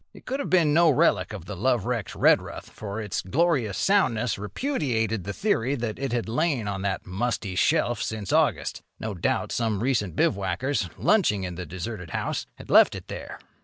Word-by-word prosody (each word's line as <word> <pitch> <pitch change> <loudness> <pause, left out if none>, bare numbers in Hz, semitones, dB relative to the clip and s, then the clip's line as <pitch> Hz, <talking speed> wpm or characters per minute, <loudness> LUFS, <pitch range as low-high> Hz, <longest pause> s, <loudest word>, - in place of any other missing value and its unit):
It - - -14
could 270 +2 -3
have 280 - -3
been 165 -5 +4
no 170 +1 +5
relic 140 - +3
of 85 - -7
the 105 - -6
lovewrecked 120 0 -1
Redruth, - - +2
for 105 0 -6
its 105 -3 -3
glorious 130 - +1
soundness 125 - +2
repudiated 110 - -1
the 100 - -3
theory 140 - 0
that 120 -4 -4
it 135 -2 -2
had 120 -2 -1
lain 130 -2 0
on 100 -1 -3
that 95 -1 -2
musty 100 +1 -2
shelf 120 - +2
since 110 -3 -3
August. - - +1 0.2
No 110 -1 -4
doubt 90 - -1
some 110 -3 -1
recent 110 -10 0
bivouackers, 100 +3 0
lunching 130 - +2
in 90 -1 -4
the 90 0 -6
deserted 95 +1 -6
house, - - -3
had - - -10
left - - +7
it - - -9
there. - - -7
115 Hz, 180 wpm, -26 LUFS, 100-140 Hz, 0.2 s, left